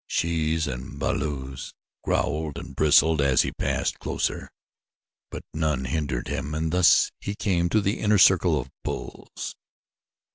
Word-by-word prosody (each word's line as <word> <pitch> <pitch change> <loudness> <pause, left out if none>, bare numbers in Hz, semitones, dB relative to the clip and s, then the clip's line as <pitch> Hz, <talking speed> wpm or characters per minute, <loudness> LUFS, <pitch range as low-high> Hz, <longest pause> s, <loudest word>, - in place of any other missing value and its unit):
Shes 80 -1 0
and 65 +1 -6
balus 70 0 -3 0.3
growled 75 0 -1
and 80 -5 -8
bristled 80 +1 +4
as 70 -2 +4
he - - -3
passed - - -2
closer, - - -3 0.8
but - - -7
none 75 -5 -1
hindered 65 -3 -2
him 75 +1 -3
and 80 0 -1
thus 90 -1 +5
he 100 - -5
came 85 -4 0
to 110 - +2
the 100 +1 -1
inner 105 -1 +3
circle 90 -4 +5
of 65 0 -7
bulls. - - -6
80 Hz, 140 wpm, -25 LUFS, 70-85 Hz, 0.8 s, thus